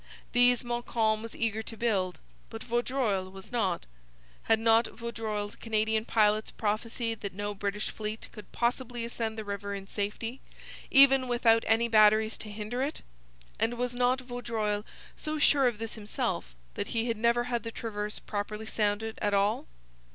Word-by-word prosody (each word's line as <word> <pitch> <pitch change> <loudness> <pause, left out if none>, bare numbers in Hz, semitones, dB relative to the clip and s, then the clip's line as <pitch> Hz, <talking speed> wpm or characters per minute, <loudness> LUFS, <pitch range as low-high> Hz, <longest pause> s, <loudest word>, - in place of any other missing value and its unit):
These 245 0 +5
Montcalm 235 -2 0
was 230 0 -7
eager 220 -1 0
to 225 0 -8
build, 190 -7 0 0.3
but 225 -1 -7
Vaudreuil 240 -5 0
was 190 +3 -11
not. 220 - 0 0.6
Had 225 - +5
not 225 +1 +4
Vaudreuil's 220 -3 -4
Canadian 220 0 0
pilots 215 -1 +3
prophesied 225 +1 -2
that 200 -3 -5
no 205 +1 -3
British 205 +1 -2
fleet 215 0 -5
could 210 - -12
possibly 240 0 -1
ascend 225 -1 -3
the 220 - -3
river 200 0 -4
in 195 -1 -7
safety, 210 +5 -4 0.5
even 270 -2 +7
without 235 -2 +4
any 225 +1 +3
batteries 215 0 +5
to 215 - -6
hinder 215 +4 -4
it? 285 +3 -3 0.6
And 235 +2 +1
was 245 +1 -2
not 250 +1 +2
Vaudreuil 225 -4 -2 0.3
so 310 0 -3
sure 285 -3 +5
of 240 -3 0
this 225 0 -4
himself 205 - -3 0.2
that - - -3
he 230 0 -1
had 230 -1 0
never 235 +2 +3
had 240 -1 -1
the 230 - -5
Traverse 210 -2 -4
properly 210 +1 -4
sounded 215 +1 -1
at 205 -1 +2
all? 200 - +1
225 Hz, 160 wpm, -29 LUFS, 210-240 Hz, 0.6 s, even